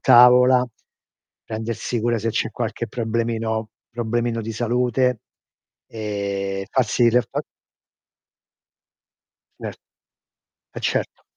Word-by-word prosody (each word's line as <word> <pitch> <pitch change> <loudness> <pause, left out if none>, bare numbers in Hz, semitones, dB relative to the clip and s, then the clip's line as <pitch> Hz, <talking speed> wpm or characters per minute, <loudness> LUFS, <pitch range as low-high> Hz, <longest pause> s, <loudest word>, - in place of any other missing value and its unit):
tavola, 125 +1 +7 0.8
prendersi 115 +1 -3
cura 115 0 +1
se 115 +2 -2
c'è 115 0 -1
qualche 120 0 -3
problemino 115 -2 -1 0.2
problemino 120 0 -1
di 115 - -4
salute, 125 +1 +1 0.7
ehm, 100 -2 -3
farsi 120 -1 +3
le 125 +2 +4
fa - - -4 2.2
Cer - - -5 1.0
eh - - -4
certo. - - -2
115 Hz, 90 wpm, -22 LUFS, 110-120 Hz, 2.2 s, tavola